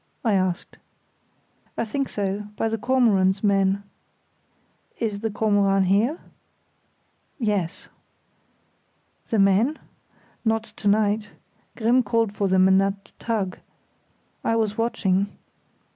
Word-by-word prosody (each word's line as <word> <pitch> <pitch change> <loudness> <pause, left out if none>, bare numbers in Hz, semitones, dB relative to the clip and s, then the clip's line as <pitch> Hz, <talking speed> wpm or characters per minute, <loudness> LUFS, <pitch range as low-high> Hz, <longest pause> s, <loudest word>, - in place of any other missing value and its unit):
I 220 - +3
asked. 185 -2 -1 1.0
"I - - 0
think 270 +5 -2
so; 200 0 -3
by 225 - 0
the 225 0 -2
Kormoran's 205 -6 +2
men." 195 -1 +2 1.1
"Is 210 -3 -2
the 225 +1 -2
Kormoran 200 -2 +2
here?" 210 - +2 1.2
"Yes." 200 - -2 1.4
"The 225 - +1
men?" 205 +9 +3 0.7
"Not 225 -1 +1
to 215 -2 -6
night. 210 0 +2 0.5
Grimm 240 +3 +3
called 230 -3 +1
for 205 -1 0
them 190 0 +4
in 190 0 +5
that 195 0 -2
tug. 210 -6 -2 0.8
I 225 - +1
was 215 -2 0
watching. 200 -4 +1
205 Hz, 110 wpm, -24 LUFS, 195-225 Hz, 1.4 s, in